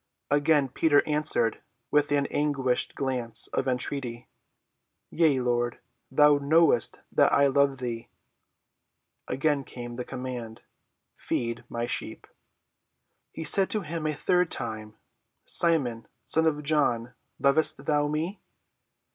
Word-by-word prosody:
Again 145 Hz, -1 st, +3 dB
Peter 145 Hz, +2 st, +2 dB
answered 150 Hz, -7 st, +1 dB, 0.3 s
with 150 Hz, 0 st, +2 dB
an 140 Hz, -1 st, +2 dB
anguished 140 Hz, -4 st, 0 dB
glance 125 Hz, -4 st, -1 dB
of 135 Hz, -, -2 dB
entreaty, 125 Hz, -2 st, -2 dB, 0.8 s
"Yea, 155 Hz, -5 st, +2 dB
Lord; 120 Hz, -1 st, -1 dB, 0.3 s
thou 145 Hz, +1 st, +4 dB
knowest 160 Hz, +4 st, +2 dB
that -, -, +3 dB
I 140 Hz, -, +4 dB
love 140 Hz, 0 st, +2 dB
thee." 120 Hz, -2 st, -6 dB, 1.2 s
Again 140 Hz, +2 st, 0 dB
came 120 Hz, -2 st, -9 dB
the 125 Hz, -, -3 dB
command, 120 Hz, -3 st, -7 dB, 0.5 s
"Feed 115 Hz, 0 st, -3 dB
my 120 Hz, 0 st, -3 dB
sheep." 120 Hz, -, -5 dB, 1.1 s
He 160 Hz, -, -7 dB
said 190 Hz, +5 st, +4 dB
to 215 Hz, -, +2 dB
him 165 Hz, -2 st, -5 dB
the 155 Hz, -1 st, -1 dB
third 180 Hz, +2 st, +1 dB
time, 110 Hz, -2 st, -5 dB, 0.5 s
"Simon, 135 Hz, -10 st, +2 dB, 0.2 s
son 160 Hz, 0 st, +3 dB
of 150 Hz, -1 st, -1 dB
John, 125 Hz, -6 st, 0 dB, 0.2 s
lovest 145 Hz, +1 st, +2 dB
thou 145 Hz, -1 st, +1 dB
me?" 160 Hz, +7 st, -3 dB
140 Hz, 120 wpm, -26 LUFS, 120-150 Hz, 1.2 s, thou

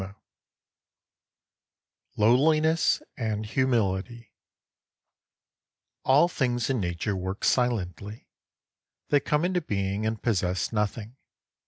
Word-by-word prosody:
32 100 Hz, +1 st, -10 dB, 2.0 s
LOWLINESS 155 Hz, +8 st, +3 dB
AND 110 Hz, -4 st, -2 dB
HUMILITY 115 Hz, -2 st, -1 dB, 1.7 s
ALL 145 Hz, +6 st, +5 dB
things 125 Hz, -6 st, -1 dB
in 130 Hz, -, 0 dB
Nature 85 Hz, +3 st, -2 dB
work 95 Hz, +2 st, -5 dB
silently. 105 Hz, -4 st, -1 dB, 0.8 s
They 145 Hz, -, +4 dB
come 150 Hz, +3 st, 0 dB
into 180 Hz, 0 st, 0 dB
being 100 Hz, -, -2 dB
and 110 Hz, 0 st, -2 dB
possess 95 Hz, -3 st, -1 dB
nothing. 105 Hz, +3 st, -3 dB
110 Hz, 85 wpm, -26 LUFS, 100-130 Hz, 2.0 s, ALL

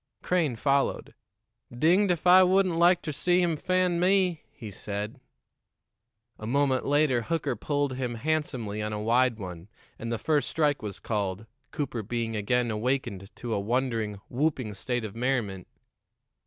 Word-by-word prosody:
Crane 165 Hz, -8 st, +1 dB
followed. 140 Hz, +3 st, 0 dB, 0.6 s
"Dinged 170 Hz, +11 st, +3 dB
if 175 Hz, -1 st, -2 dB
I 180 Hz, +1 st, +8 dB
wouldn't 185 Hz, -1 st, +3 dB
like 175 Hz, +1 st, +4 dB
ter 155 Hz, -, -3 dB
see 175 Hz, +5 st, +2 dB
him 175 Hz, -3 st, +2 dB
fan 180 Hz, +2 st, +1 dB
me!" 180 Hz, -2 st, +2 dB
he 110 Hz, -4 st, -9 dB
said. 105 Hz, +2 st, -5 dB, 1.2 s
A 110 Hz, -, -6 dB
moment 135 Hz, 0 st, +1 dB
later 145 Hz, -4 st, +3 dB
Hooker 145 Hz, -1 st, -1 dB
pulled 145 Hz, +3 st, -1 dB
him 125 Hz, -2 st, -3 dB
handsomely 125 Hz, -6 st, -2 dB
on 105 Hz, 0 st, -3 dB
a 105 Hz, -, -3 dB
wide 120 Hz, +2 st, +2 dB
one, 90 Hz, -2 st, -8 dB, 0.3 s
and 115 Hz, +1 st, -4 dB
the 115 Hz, -, 0 dB
first 150 Hz, +3 st, +1 dB
strike 150 Hz, -3 st, +1 dB
was 105 Hz, -3 st, -6 dB
called, 100 Hz, -1 st, -2 dB, 0.2 s
Cooper 135 Hz, -7 st, -3 dB
being 115 Hz, +1 st, -3 dB
again 120 Hz, +3 st, 0 dB
awakened 110 Hz, -4 st, -2 dB
to 120 Hz, -2 st, -4 dB
a -, -, 0 dB
wondering, 115 Hz, -2 st, -1 dB
whooping 130 Hz, -5 st, -1 dB
state 120 Hz, +3 st, -3 dB
of 105 Hz, -, -8 dB
merriment. 115 Hz, -7 st, -1 dB
125 Hz, 155 wpm, -27 LUFS, 110-155 Hz, 1.2 s, I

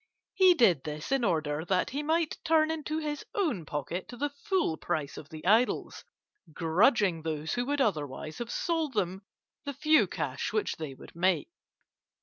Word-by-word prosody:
He 370 Hz, -2 st, +6 dB
did 190 Hz, -, +4 dB
this 150 Hz, -, -6 dB
in 270 Hz, -2 st, +2 dB
order 155 Hz, -6 st, 0 dB
that 185 Hz, +1 st, 0 dB
he 280 Hz, +3 st, -2 dB
might 320 Hz, +1 st, 0 dB
turn 320 Hz, -1 st, +3 dB
into 310 Hz, -1 st, -3 dB
his 300 Hz, -1 st, -3 dB
own 280 Hz, -, 0 dB
pocket 150 Hz, +5 st, -4 dB
the 280 Hz, +4 st, -3 dB
full 285 Hz, -, 0 dB
price 155 Hz, -3 st, -3 dB
of 145 Hz, -, -10 dB
the 155 Hz, 0 st, -9 dB
idols, 225 Hz, +6 st, +2 dB, 0.5 s
grudging 180 Hz, -, +3 dB
those 155 Hz, -1 st, -3 dB
who 245 Hz, 0 st, -1 dB
would 290 Hz, 0 st, 0 dB
otherwise 155 Hz, -, -2 dB
have 240 Hz, -1 st, -4 dB
sold 325 Hz, -6 st, -1 dB
them 190 Hz, -1 st, -1 dB, 0.4 s
the 285 Hz, -, -4 dB
few 305 Hz, +3 st, +4 dB
cash -, -, -3 dB
which 430 Hz, -, -1 dB
they 150 Hz, -4 st, -6 dB
would -, -, -14 dB
make. 180 Hz, -, +1 dB
210 Hz, 165 wpm, -29 LUFS, -, 0.5 s, He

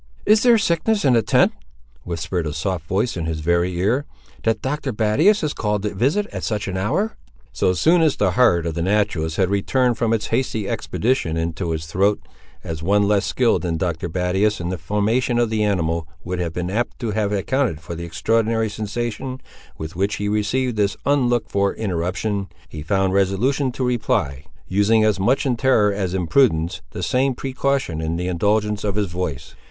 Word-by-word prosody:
"Is 215 Hz, +1 st, +5 dB
there 240 Hz, -2 st, +6 dB
sickness 205 Hz, 0 st, +1 dB
in 130 Hz, -, +5 dB
the 115 Hz, -, +4 dB
tent," 110 Hz, -, +3 dB, 0.5 s
whispered 85 Hz, -1 st, -3 dB
a 75 Hz, -, -3 dB
soft 80 Hz, +1 st, -3 dB
voice 100 Hz, +7 st, 0 dB
in 85 Hz, -2 st, -3 dB
his 80 Hz, -1 st, -3 dB
very 85 Hz, +2 st, +1 dB
ear, 115 Hz, +10 st, +1 dB, 0.4 s
"that 115 Hz, 0 st, 0 dB
Dr. 135 Hz, 0 st, -2 dB
Battius 120 Hz, -, +3 dB
is 150 Hz, -, 0 dB
called 105 Hz, -2 st, -1 dB
to 105 Hz, -, -2 dB
visit 140 Hz, -, +1 dB
it -, -, -17 dB
at -, -, -5 dB
such 105 Hz, -2 st, -2 dB
an 95 Hz, -, -3 dB
hour?" 150 Hz, -, -1 dB, 0.4 s
So 90 Hz, -, +2 dB
soon 165 Hz, -, +3 dB
as 155 Hz, -3 st, +3 dB
the 95 Hz, -, +1 dB
heart 90 Hz, -6 st, +3 dB
of 85 Hz, -, -2 dB
the 85 Hz, -, -3 dB
naturalist 95 Hz, -4 st, 0 dB
had 95 Hz, -1 st, +2 dB
returned 120 Hz, +4 st, +1 dB
from 115 Hz, -1 st, +1 dB
its 110 Hz, -2 st, 0 dB
hasty 115 Hz, -4 st, 0 dB
expedition 110 Hz, -9 st, -1 dB
into 85 Hz, +2 st, -2 dB
his 80 Hz, -1 st, -3 dB
throat, 100 Hz, +5 st, +1 dB, 0.4 s
as 80 Hz, -1 st, -5 dB
one 100 Hz, +4 st, +3 dB
less 105 Hz, -1 st, +2 dB
skilled 125 Hz, -3 st, +2 dB
than 85 Hz, -2 st, -2 dB
Dr. 85 Hz, 0 st, -2 dB
Battius 95 Hz, +5 st, 0 dB
in 85 Hz, 0 st, -3 dB
the 90 Hz, -1 st, -3 dB
formation 105 Hz, +8 st, 0 dB
of 120 Hz, -2 st, +1 dB
the 110 Hz, -1 st, +1 dB
animal 85 Hz, -5 st, 0 dB, 0.2 s
would 90 Hz, +1 st, -4 dB
have 85 Hz, -2 st, -2 dB
been 90 Hz, +1 st, -3 dB
apt 120 Hz, +4 st, -2 dB
to 115 Hz, -3 st, -3 dB
have 105 Hz, -1 st, 0 dB
accounted 105 Hz, -, 0 dB
for 85 Hz, +2 st, -8 dB
the 85 Hz, +1 st, -6 dB
extraordinary 115 Hz, +6 st, 0 dB
sensation 120 Hz, +5 st, -4 dB, 0.4 s
with 80 Hz, +1 st, -7 dB
which 100 Hz, +3 st, 0 dB
he 105 Hz, -, -3 dB
received 110 Hz, +4 st, 0 dB
this 100 Hz, -1 st, +1 dB
unlooked 125 Hz, -4 st, +1 dB
for 100 Hz, 0 st, +1 dB
interruption, 95 Hz, +1 st, -2 dB, 0.2 s
he 75 Hz, -, -8 dB
found 95 Hz, +3 st, +1 dB
resolution 110 Hz, +8 st, +1 dB
to 130 Hz, -, -2 dB
reply; 80 Hz, -, -1 dB, 0.2 s
using, 105 Hz, +3 st, +3 dB
as 105 Hz, -2 st, +2 dB
much 120 Hz, +10 st, +2 dB
in 130 Hz, -3 st, +1 dB
terror 115 Hz, -5 st, +3 dB
as 95 Hz, -2 st, -2 dB
in 90 Hz, -2 st, -1 dB
prudence, 80 Hz, -6 st, +2 dB
the 90 Hz, -, -6 dB
same 130 Hz, +9 st, +1 dB
precaution 135 Hz, -, -1 dB
in 80 Hz, +1 st, -2 dB
the 90 Hz, +1 st, -2 dB
indulgence 105 Hz, +3 st, 0 dB
of 100 Hz, -2 st, -1 dB
his 105 Hz, -1 st, +1 dB
voice. 80 Hz, -4 st, -4 dB
105 Hz, 195 wpm, -21 LUFS, 90-120 Hz, 0.5 s, there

